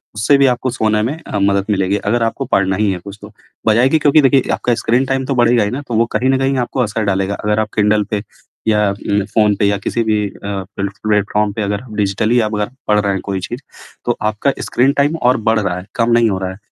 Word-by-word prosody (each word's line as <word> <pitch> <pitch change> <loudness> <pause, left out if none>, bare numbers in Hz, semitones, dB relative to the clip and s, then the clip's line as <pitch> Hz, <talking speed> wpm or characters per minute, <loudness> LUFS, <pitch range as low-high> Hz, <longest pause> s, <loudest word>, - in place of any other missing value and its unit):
उससे 110 +7 +3
भी 140 - +4
आपको 130 +1 -3
सोने 110 -2 +1
में 145 +7 -2
अ, 100 - -2
मदद 100 0 +1
मिलेगी। 100 -1 +1
अगर 120 -1 +1
आपको 115 - -2
पढ़ना 95 0 +2
ही 105 -2 +1
है 90 - -3
कुछ 100 +1 -9
तो, 105 +1 -11 0.4
बजाय 120 +5 +4
कि 160 - +2
क्योंकि 150 +1 +4
देखिए, 135 -1 +4
आपका 120 - 0
स्क्रीन 125 +4 +2
टाइम 135 0 -1
तो 135 - -2
बढ़ेगा 120 -2 +3
ही 105 - -2
ना, 135 +3 -4
तो - - -3
वो 115 +1 +3
कहीं 130 - 0
न 135 - +3
कहीं 135 0 0
आपको 130 - -2
असर 110 -1 -1
डालेगा, 95 0 0
अगर 105 +1 +1
आप 110 - -1
किंडल 105 0 +3
पे 105 -1 -1 0.4
या 105 -2 +3
उम, 100 0 -1
फ़ोन 105 0 +2
पे 100 - 0
या 100 0 +2
किसी 115 +3 -1
भी 105 -2 0
अ, - - -15
प्लेट 100 0 -4
प्लेटफ़ॉर्म 105 0 +1
पे 110 - -4
अगर 100 0 -2
आप 110 -4 -12
डिजिटली 105 +4 +1
अगर 105 -1 -1 0.2
पढ़ 105 0 +3
रहे 100 -1 0
हैं 95 - -3
कोई 95 -1 -2
चीज़, 120 +8 -6 0.4
तो 120 - 0
आपका 110 +6 0
स्क्रीन 130 +3 +2
टाइम 145 +3 +1
और 125 +1 +4
बढ़ 110 -1 +3
रहा 90 -3 -2
है, 90 - -8
कम 115 0 +1
नहीं 115 -1 +4
हो 95 -2 -2
रहा 95 -1 -3
है। 95 - -10
105 Hz, 255 wpm, -17 LUFS, 100-120 Hz, 0.4 s, भी